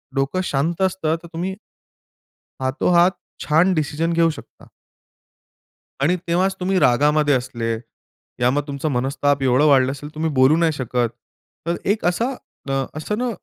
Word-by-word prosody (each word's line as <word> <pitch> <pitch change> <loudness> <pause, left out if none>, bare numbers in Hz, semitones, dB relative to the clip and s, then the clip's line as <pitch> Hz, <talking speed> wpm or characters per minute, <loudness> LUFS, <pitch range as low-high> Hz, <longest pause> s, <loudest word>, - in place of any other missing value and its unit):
डोकं 135 +7 0
शांत 160 +4 -1
असतं 185 -4 0
तर - - -10
तुम्ही 185 +3 -3 1.1
हातोहात 170 +7 +3 0.3
छान 165 +5 +3
डिसिजन 155 +1 -1
घेऊ 165 0 +3
शकता. - - -17 1.3
आणि 165 +6 +3
तेव्हाच 185 +3 +1
तुम्ही 185 +1 +1
रागामध्ये 145 +2 +3
असले, 120 -2 -2 0.7
या 125 - +4
मग 145 +2 +1
तुमचं 140 +2 -3
मनस्ताप 135 +2 0
एवढं 130 +3 +3
वाढलं 130 -2 +4
असेल 145 +2 -8
तुम्ही 160 +1 -1
बोलू 130 +4 +6
नाही 165 -1 +3
शकत. 125 -3 -1 0.6
तर 170 - +1
एक 205 0 0
असा 230 +9 +1 0.4
अ, - - 0 0.3
असं 210 +7 -3
न 250 +1 -1
155 Hz, 145 wpm, -21 LUFS, 135-175 Hz, 1.3 s, बोलू